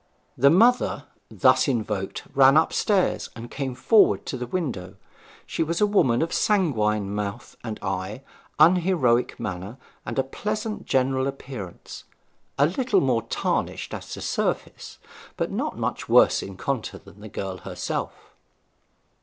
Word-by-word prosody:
The 140 +3 +5
mother 235 +10 +3 0.3
thus - - +3
invoked 105 -7 -2
ran 135 +1 +6
upstairs 185 +4 +1
and 120 0 -9
came 135 -3 -4
forward 215 - +4
to - - -4
the 125 -1 -5
window. 120 - -4 0.5
She - - -3
was 165 +1 0
a 210 - +5
woman 160 - +3
of 165 - -3
sanguine 110 - +1
mouth 105 +3 -5
and 110 -3 -5
eye, 95 +5 -4 0.3
unheroic 165 -7 +3
manner, 95 +4 -5 0.3
and - - -3
pleasant 215 +1 -3
general 130 0 +1
appearance; 130 -9 -8 0.5
a 140 - +5
little 205 - +1
more 125 -4 +1
tarnished 115 - -2
as - - -7
to - - -7
surface, - - -3 0.4
but - - -2
not - - -3
much - - -3
worse - - +5
in 95 -1 -8
contour 135 -2 -3
than 100 +1 -17
the 110 - -9
girl 95 -1 -5
herself. 90 -2 -5
130 Hz, 135 wpm, -24 LUFS, 105-165 Hz, 0.5 s, ran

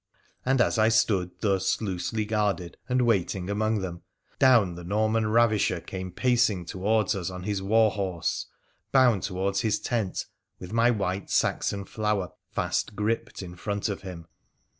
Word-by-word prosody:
And 130 0 +2
as 115 - +2
I 110 +1 +5
stood 105 -5 +2
thus 100 -3 +1
loosely 105 +2 -2
guarded 105 -5 -1
and 125 0 +2
waiting 95 -4 0
among 110 0 0
them, 85 -2 -5 0.4
down 120 -9 +5
the 85 0 -9
Norman 110 +4 +1
ravisher 110 -5 +3
came 95 +1 -6
pacing 120 -4 +2
towards 100 +3 +1
us 95 -3 -3
on 90 -1 -7
his 100 -1 -2
war 110 +2 +4
horse, 95 -5 -2 0.4
bound 125 -7 +4
towards 95 +2 -1
his 110 -2 +1
tent, 110 -6 -2 0.3
with 90 +3 -9
my 115 +1 +4
white 100 -4 -1
Saxon 100 -1 0
flower 105 -5 -1 0.2
fast 105 - -2
gripped 105 -1 -2
in 90 -1 -8
front 100 +3 -2
of 100 - -4
him. 90 -4 -8
100 Hz, 155 wpm, -27 LUFS, 95-110 Hz, 0.4 s, I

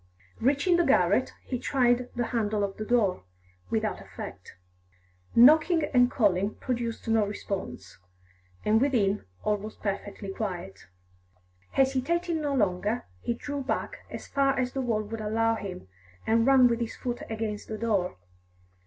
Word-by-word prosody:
Reaching 285 +8 +3
the 345 - +4
garret, - - +3
he 250 - -3
tried 245 -2 +2
the 240 0 0
handle 215 -3 0
of 195 -1 -3
the 215 - -4
door, 215 - +1 0.5
without - - -1
effect. - - -9 0.8
Knocking 310 +7 +6
and 245 -1 +5
calling 200 -4 +1
produced 235 -2 -3
no 225 -1 +3
response, 185 - -5 0.7
and 220 +2 +4
within 215 -8 +1 0.2
all 210 0 +1
was 215 +2 -8
perfectly 200 -1 -4
quiet. 175 - -5 0.9
Hesitating 315 +6 +1
no 290 -2 -1
longer, 205 +1 0 0.2
he 235 - -1
drew 285 +3 -4
back 265 - -3
as - - -7
far 275 -1 +1
as 250 -1 0
the 270 - -1
wall 225 -4 0
would 220 +1 -6
allow 225 +2 +1
him, 195 - -6 0.4
and 230 +2 +3
ran 265 -2 +7
with 235 -1 0
his 235 -1 -3
foot 245 -1 -4
against 220 -2 -4
the 215 - -4
door. 205 - 0
225 Hz, 145 wpm, -28 LUFS, 205-260 Hz, 0.9 s, ran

